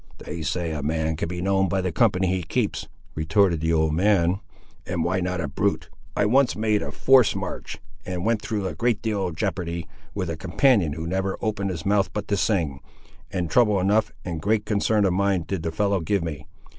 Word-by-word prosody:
"They 80 Hz, +2 st, -7 dB
say 85 Hz, +2 st, -2 dB
a 75 Hz, -2 st, -3 dB
man 80 Hz, +2 st, -1 dB
can 85 Hz, -, -3 dB
be 90 Hz, +1 st, -4 dB
known 95 Hz, -1 st, +2 dB
by 95 Hz, -, 0 dB
the 90 Hz, -1 st, -1 dB
company 95 Hz, 0 st, +2 dB
he 95 Hz, 0 st, 0 dB
keeps," 80 Hz, -, -2 dB, 0.3 s
retorted 80 Hz, +2 st, +2 dB
the 80 Hz, 0 st, +1 dB
old 80 Hz, -1 st, +2 dB
man, 95 Hz, 0 st, +3 dB, 0.4 s
"and 85 Hz, -2 st, -2 dB
why 95 Hz, +2 st, 0 dB
not 90 Hz, 0 st, -2 dB
a 80 Hz, -, -1 dB
brute? -, -, -1 dB, 0.3 s
I 100 Hz, -, +3 dB
once 130 Hz, +5 st, +3 dB
made 105 Hz, -1 st, +1 dB
a -, -, -4 dB
forced 130 Hz, -6 st, +4 dB
march, 95 Hz, -2 st, -5 dB, 0.3 s
and 90 Hz, 0 st, -4 dB
went 115 Hz, -1 st, +1 dB
through 105 Hz, -3 st, -3 dB
a -, -, -2 dB
great 120 Hz, -2 st, 0 dB
deal 105 Hz, -4 st, 0 dB
of 85 Hz, -, -6 dB
jeopardy, 85 Hz, +1 st, -2 dB, 0.3 s
with 90 Hz, -5 st, -2 dB
a -, -, -3 dB
companion 85 Hz, -, +2 dB
who 80 Hz, +2 st, -5 dB
never 95 Hz, +3 st, -1 dB
opened 105 Hz, -2 st, -1 dB
his 85 Hz, -4 st, -5 dB
mouth 100 Hz, 0 st, +2 dB
but 105 Hz, -1 st, -4 dB
to 100 Hz, -, +2 dB
sing; 85 Hz, -10 st, 0 dB, 0.5 s
and 90 Hz, -3 st, -2 dB
trouble 105 Hz, +2 st, +3 dB
enough 105 Hz, +4 st, +2 dB
and 85 Hz, -3 st, -4 dB
great 105 Hz, +3 st, +1 dB
concern 105 Hz, 0 st, +2 dB
of 95 Hz, -, +2 dB
mind 95 Hz, -2 st, +1 dB
did 95 Hz, -2 st, -3 dB
the 80 Hz, -, -2 dB
fellow 100 Hz, +3 st, +1 dB
give 90 Hz, +2 st, 0 dB
me. 75 Hz, -2 st, -6 dB
95 Hz, 210 wpm, -24 LUFS, 85-105 Hz, 0.5 s, forced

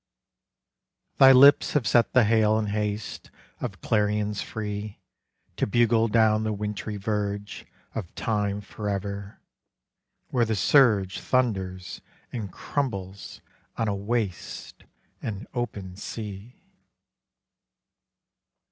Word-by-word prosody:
Thy 135 Hz, 0 st, +9 dB
lips 140 Hz, +3 st, +7 dB
have 145 Hz, -6 st, +1 dB
set 120 Hz, -1 st, +3 dB
the 125 Hz, -, +6 dB
hail 110 Hz, 0 st, +3 dB
and 105 Hz, -2 st, -1 dB
haste 105 Hz, 0 st, -3 dB, 0.3 s
Of -, -, -5 dB
clarions 105 Hz, -1 st, 0 dB
free 105 Hz, -1 st, -5 dB, 0.6 s
To -, -, 0 dB
bugle 115 Hz, +1 st, +3 dB
down 110 Hz, -1 st, +3 dB
the 110 Hz, -, -1 dB
wintry 105 Hz, 0 st, -4 dB
verge 105 Hz, 0 st, -3 dB, 0.3 s
Of 100 Hz, -7 st, -6 dB
time 105 Hz, -2 st, -1 dB
forever, 100 Hz, -1 st, -5 dB, 0.9 s
where 125 Hz, -2 st, +2 dB
the 110 Hz, 0 st, -1 dB
surge 100 Hz, -2 st, +4 dB
Thunders 95 Hz, -8 st, -1 dB, 0.3 s
and 105 Hz, -6 st, -4 dB
crumbles 100 Hz, -9 st, -4 dB, 0.4 s
on 115 Hz, -, 0 dB
a 100 Hz, -, 0 dB
waste 100 Hz, -2 st, -4 dB, 0.4 s
And 105 Hz, 0 st, -5 dB
open 105 Hz, -7 st, -4 dB
sea. 105 Hz, +2 st, -8 dB
105 Hz, 105 wpm, -26 LUFS, 100-115 Hz, 0.9 s, Thy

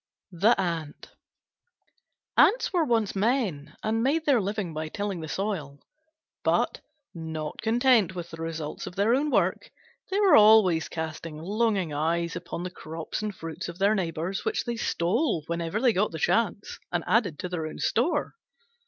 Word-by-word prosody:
THE 200 Hz, +6 st, +3 dB
ANT 165 Hz, -5 st, -3 dB, 1.2 s
Ants 470 Hz, -1 st, +4 dB
were 350 Hz, -3 st, +3 dB
once 225 Hz, -6 st, +1 dB
men 195 Hz, -, 0 dB
and 220 Hz, +1 st, 0 dB
made 300 Hz, +6 st, +1 dB
their 270 Hz, -6 st, +4 dB
living 200 Hz, -3 st, -3 dB
by 155 Hz, 0 st, -3 dB
tilling 200 Hz, -1 st, -3 dB
the 160 Hz, -, -6 dB
soil. 160 Hz, -7 st, -3 dB, 0.7 s
But, -, -, +1 dB, 0.3 s
not 160 Hz, -2 st, -5 dB
content 225 Hz, -4 st, +3 dB
with 170 Hz, -1 st, -6 dB
the 165 Hz, 0 st, -8 dB
results 160 Hz, -2 st, -5 dB
of 180 Hz, -, -8 dB
their 205 Hz, +4 st, +3 dB
own 285 Hz, +4 st, +1 dB
work, 195 Hz, -8 st, +1 dB, 0.4 s
they 390 Hz, +2 st, 0 dB
were 400 Hz, -3 st, +6 dB
always 210 Hz, -6 st, +6 dB
casting 160 Hz, -1 st, -5 dB
longing 195 Hz, -1 st, 0 dB
eyes 170 Hz, +3 st, 0 dB
upon 175 Hz, -1 st, -5 dB
the 180 Hz, -, -5 dB
crops 160 Hz, +2 st, -6 dB
and 210 Hz, -2 st, -4 dB
fruits 165 Hz, 0 st, -6 dB
of 170 Hz, -, -8 dB
their 200 Hz, +2 st, +3 dB
neighbours, 180 Hz, -1 st, -2 dB
which 445 Hz, -, -1 dB
they 240 Hz, -1 st, -2 dB
stole, 215 Hz, -, 0 dB
whenever 170 Hz, +4 st, -2 dB
they 245 Hz, -1 st, +3 dB
got 210 Hz, +3 st, +1 dB
the 160 Hz, -, -6 dB
chance, 200 Hz, +5 st, 0 dB
and 175 Hz, -2 st, -1 dB
added 185 Hz, -5 st, +2 dB
to 180 Hz, -, -4 dB
their 165 Hz, -3 st, -3 dB
own 155 Hz, -, -8 dB
store. 295 Hz, +6 st, 0 dB
185 Hz, 165 wpm, -27 LUFS, 165-225 Hz, 1.2 s, were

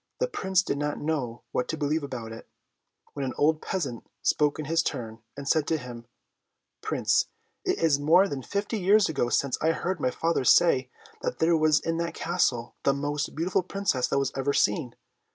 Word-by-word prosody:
The -, -, +1 dB
Prince 190 Hz, -, +1 dB
did 140 Hz, -, -2 dB
not 145 Hz, 0 st, -2 dB
know 135 Hz, -7 st, -3 dB
what 125 Hz, -, -1 dB
to 160 Hz, -, -3 dB
believe 150 Hz, +1 st, 0 dB
about 125 Hz, -5 st, -6 dB
it, 115 Hz, -, -10 dB, 0.6 s
when 140 Hz, -, -4 dB
an 130 Hz, -2 st, -3 dB
old 155 Hz, +1 st, +2 dB
peasant 140 Hz, -, -3 dB, 0.2 s
spoke 150 Hz, -1 st, +2 dB
in 155 Hz, -, -4 dB
his 165 Hz, +3 st, +2 dB
turn, 115 Hz, -7 st, -4 dB, 0.2 s
and 140 Hz, -1 st, -6 dB
said 155 Hz, 0 st, +2 dB
to 160 Hz, -, +1 dB
him, 120 Hz, -3 st, -9 dB, 0.7 s
"Prince, -, -, +1 dB, 0.4 s
it -, -, 0 dB
is 155 Hz, -4 st, +2 dB
more 170 Hz, +7 st, +5 dB
than 140 Hz, -7 st, -4 dB
fifty 205 Hz, -, -3 dB
years 200 Hz, +3 st, +4 dB
ago 135 Hz, -6 st, 0 dB
since 140 Hz, +1 st, 0 dB
I 160 Hz, +1 st, +3 dB
heard 185 Hz, +2 st, -2 dB
my 125 Hz, -, +1 dB
father 165 Hz, +2 st, 0 dB
say 130 Hz, -2 st, +4 dB, 0.3 s
that -, -, -2 dB
there 165 Hz, +1 st, +3 dB
was 155 Hz, -1 st, +4 dB
in 165 Hz, 0 st, -2 dB
that 170 Hz, 0 st, -3 dB
Castle 130 Hz, -9 st, 0 dB
the 135 Hz, -, +2 dB
most 145 Hz, +1 st, -2 dB
beautiful 175 Hz, +4 st, +1 dB
Princess 185 Hz, -8 st, -1 dB
that -, -, 0 dB
was 140 Hz, -, 0 dB
ever 135 Hz, +1 st, 0 dB
seen. 135 Hz, -7 st, +1 dB
150 Hz, 195 wpm, -27 LUFS, 130-165 Hz, 0.7 s, more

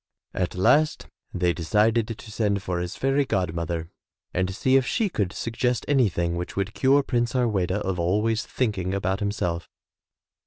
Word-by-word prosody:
At 90 Hz, -1 st, -2 dB
last 150 Hz, +12 st, +3 dB, 0.3 s
they 90 Hz, -1 st, +1 dB
decided 105 Hz, +7 st, +2 dB
to 115 Hz, -1 st, -8 dB
send 100 Hz, -3 st, 0 dB
for 90 Hz, -2 st, -2 dB
his 90 Hz, 0 st, -4 dB
fairy 135 Hz, +2 st, +2 dB
god 90 Hz, -10 st, -1 dB
mother 85 Hz, 0 st, -3 dB, 0.4 s
and 95 Hz, 0 st, 0 dB
see 130 Hz, +5 st, +2 dB
if 135 Hz, -1 st, +3 dB
she 225 Hz, -4 st, +1 dB
could 100 Hz, -, -1 dB
suggest 115 Hz, +3 st, -1 dB
anything 90 Hz, -11 st, +2 dB
which 90 Hz, +1 st, -5 dB
would 100 Hz, +1 st, -2 dB
cure 140 Hz, +2 st, +4 dB
Prince 120 Hz, -3 st, 0 dB
Har 125 Hz, -1 st, +2 dB
weda 95 Hz, -5 st, 0 dB
of 95 Hz, -3 st, -2 dB
always 105 Hz, +6 st, +1 dB
thinking 100 Hz, -6 st, -1 dB
about 95 Hz, 0 st, -1 dB
himself. 90 Hz, -5 st, -2 dB
100 Hz, 165 wpm, -25 LUFS, 90-120 Hz, 0.4 s, cure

